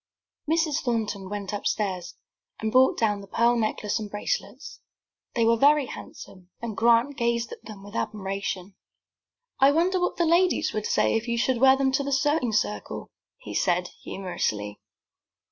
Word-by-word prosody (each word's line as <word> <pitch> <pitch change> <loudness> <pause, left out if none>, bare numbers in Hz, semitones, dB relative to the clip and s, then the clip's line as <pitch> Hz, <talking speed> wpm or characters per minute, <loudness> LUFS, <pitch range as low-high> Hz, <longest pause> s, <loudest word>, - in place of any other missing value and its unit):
Mrs. 320 -2 +2
Thornton 215 -6 -2
went 205 -1 -5
upstairs, 195 -3 -2 0.4
and 220 0 -2
brought 260 +2 +5
down 210 -3 +1
the 200 - -12
pearl 235 +4 +2
necklace 215 -2 -1
and 210 -1 -6
bracelets. 205 - -4 0.6
They 230 -1 +3
were 230 0 +4
very 290 +3 +5
handsome 185 -6 -11
and 230 -2 -5
Grant 235 +5 +3
gazed 235 -1 0
at - - -10
them 205 -3 -10
with 205 +2 -11
admiration. 195 -2 -3 0.9
"I 270 +1 +6
wonder 355 +5 +2
what 360 - -1
the 345 - +2
ladies 345 +3 +2
would 215 -1 -2
say - - +2
if 225 +2 -1
you 235 0 -1
should 245 +1 +1
wear 265 0 +7
them 270 -1 +2
to 275 +1 +1
the 280 - -3
sewing 270 -2 +1
circle," 105 - -2 0.3
he 105 - -9
said, 180 - +1
humorously. 105 - -3
230 Hz, 160 wpm, -26 LUFS, 200-265 Hz, 0.9 s, wear